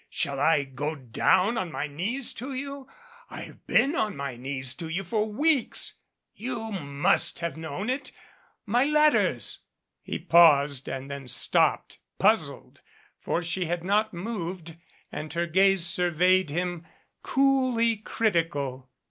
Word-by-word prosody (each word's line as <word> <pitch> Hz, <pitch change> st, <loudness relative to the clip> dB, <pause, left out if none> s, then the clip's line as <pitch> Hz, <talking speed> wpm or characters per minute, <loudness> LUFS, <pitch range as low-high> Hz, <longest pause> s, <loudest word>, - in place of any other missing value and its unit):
Shall 140 Hz, -1 st, -1 dB
I 145 Hz, 0 st, +3 dB
go 140 Hz, +3 st, -4 dB
down 180 Hz, -, +1 dB
on 180 Hz, -3 st, -4 dB
my 150 Hz, -, -3 dB
knees 200 Hz, -, -2 dB
to 265 Hz, +4 st, -6 dB
you. 275 Hz, 0 st, -6 dB, 0.4 s
I -, -, -8 dB
have -, -, -12 dB
been 280 Hz, -, +3 dB
on 215 Hz, -, -1 dB
my 140 Hz, -3 st, -4 dB
knees 130 Hz, +1 st, -4 dB
to 165 Hz, -, -5 dB
you 180 Hz, +4 st, -2 dB
for 215 Hz, +3 st, -1 dB
weeks 290 Hz, +3 st, 0 dB, 0.3 s
you 225 Hz, -1 st, -5 dB
must 150 Hz, -1 st, +1 dB
have 170 Hz, -1 st, -3 dB
known 160 Hz, +5 st, -5 dB
it. 260 Hz, +1 st, -3 dB, 0.5 s
My 240 Hz, +5 st, +2 dB
letters 300 Hz, +1 st, +2 dB, 0.2 s
" -, -, -57 dB
He -, -, -4 dB
paused 145 Hz, -5 st, +4 dB
and 135 Hz, +1 st, -5 dB
then 140 Hz, -2 st, -7 dB
stopped, 125 Hz, -1 st, +1 dB, 0.2 s
puzzled, -, -, 0 dB, 0.4 s
for 175 Hz, -, -2 dB
she 180 Hz, +2 st, -2 dB
had 170 Hz, 0 st, -3 dB
not 210 Hz, +3 st, +1 dB
moved 175 Hz, -4 st, -5 dB, 0.4 s
and 155 Hz, -1 st, -6 dB
her 170 Hz, 0 st, 0 dB
gaze 190 Hz, +1 st, +3 dB
surveyed 180 Hz, 0 st, +2 dB
him, 175 Hz, +1 st, -3 dB, 0.3 s
coolly 255 Hz, -4 st, +2 dB
critical. 160 Hz, -, -1 dB
175 Hz, 140 wpm, -26 LUFS, 150-225 Hz, 0.5 s, paused